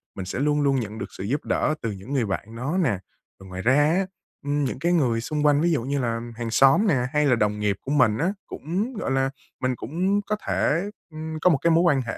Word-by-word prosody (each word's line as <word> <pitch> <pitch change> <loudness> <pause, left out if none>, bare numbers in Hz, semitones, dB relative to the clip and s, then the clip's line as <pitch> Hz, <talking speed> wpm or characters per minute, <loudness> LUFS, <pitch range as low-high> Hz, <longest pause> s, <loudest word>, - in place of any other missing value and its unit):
mình 95 - -5
sẽ 95 - -4
luôn 150 +1 +2
luôn 135 -2 +2
nhận 110 -1 -5
được - - -4
sự 95 - -8
giúp 135 +9 -2
đỡ 155 - +1
từ 115 - -2
những 100 +8 -8
người 125 -5 +1
bạn 105 +3 -4
nó 140 +10 -2
nè. 120 - +1 0.4
Ừm, 95 -1 -13
ngoài 95 0 -5
ra 130 +5 +3
á, 160 +6 +3 0.4
ưm, 145 0 0
những 130 0 -2
cái 170 +3 +1
người 120 -8 +2
xung 150 +3 -2
quanh 145 0 +4
ví 170 0 +2
dụ 135 -8 0
như 140 +2 -1
là 115 -2 -1 0.2
hàng 115 -1 -4
xóm 135 - +5
nè 160 - +4 0.2
hay 150 0 +3
là 125 -3 +4
đồng 105 -1 0
nghiệp 105 -2 +1
của 140 - -5
mình 110 -7 +3
á, 185 - 0
cũng, 195 - -3
gọi 205 - -3
là 135 0 +2 0.3
mình 130 -1 0
cũng 185 - 0
có 210 +1 -2
thể, 165 +5 +1 0.3
ừm, 155 0 -5
có 180 - +5
một 155 - +4
cái 170 - +3
mối 165 +1 +5
quan 145 -6 +3
hệ 120 - -5
140 Hz, 260 wpm, -24 LUFS, 115-160 Hz, 0.4 s, xóm